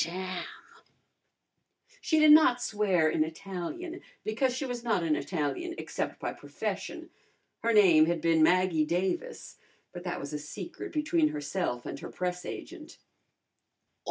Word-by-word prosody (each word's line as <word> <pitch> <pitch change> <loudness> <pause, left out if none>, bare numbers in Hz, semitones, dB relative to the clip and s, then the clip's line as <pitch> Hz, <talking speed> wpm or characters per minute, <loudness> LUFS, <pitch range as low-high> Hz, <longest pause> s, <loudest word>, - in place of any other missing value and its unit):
Damn!" 185 +1 -4 1.6
She 315 - +1
did 310 -1 +7
not 300 -5 +7
swear 205 -8 +1
in 155 0 +2
Italian, 195 - -6 0.2
because 230 +5 +1
she 260 +3 -3
was 245 -2 -4
not 215 -7 +1
an 160 -2 +2
Italian 190 - -2
except - - -4
by - - -3
profession. - - -5 0.5
Her 230 - +1
name 175 -8 +6
had 170 0 0
been 165 0 +3
Maggie 180 -1 +4
Davis, 190 - -2 0.3
but 175 -1 -8
that 175 -1 -3
was 140 +2 -6
a 150 - -2
secret 170 +5 -7
between 295 - +2
herself 145 -3 -3
and 140 - -5
her - - -7
press 180 0 -3
agent. - - -8
185 Hz, 140 wpm, -29 LUFS, 160-240 Hz, 1.6 s, did